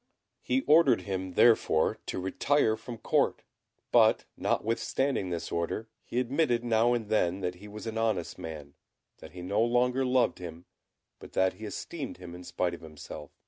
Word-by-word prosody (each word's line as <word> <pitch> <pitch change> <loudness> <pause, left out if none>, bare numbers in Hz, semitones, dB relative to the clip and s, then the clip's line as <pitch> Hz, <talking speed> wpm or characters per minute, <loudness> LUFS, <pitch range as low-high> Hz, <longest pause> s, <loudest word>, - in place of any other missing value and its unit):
He 130 +1 +1
ordered 155 - +5
him, 95 -1 -4
therefore, 110 -9 +4
to - - -3
retire 110 +6 +2
from 115 +1 -8
Court; - - +1 0.5
but, - - +5
notwithstanding 115 -1 0
this 85 -1 -4
order, 85 +7 -2
he 120 - -2
admitted 125 -1 +1
now 115 0 +3
and 115 -3 -3
then 95 -3 +1
that 90 -1 -1
he 105 - -10
was 105 +2 -9
an 115 0 -3
honest 110 -7 -1
man; 75 -3 -7 0.5
that 80 - -12
he 90 -1 -8
no 100 +4 +1
longer 125 +2 +2
loved 125 0 +2
him, 85 -1 -8 0.5
but - - -12
that 95 0 +2
he 110 - -9
esteemed 140 +6 -6
him 90 -1 -10
in 90 +1 -9
spite 90 0 -1
of 85 - -8
himself. 75 -1 -9
105 Hz, 170 wpm, -29 LUFS, 90-120 Hz, 0.5 s, ordered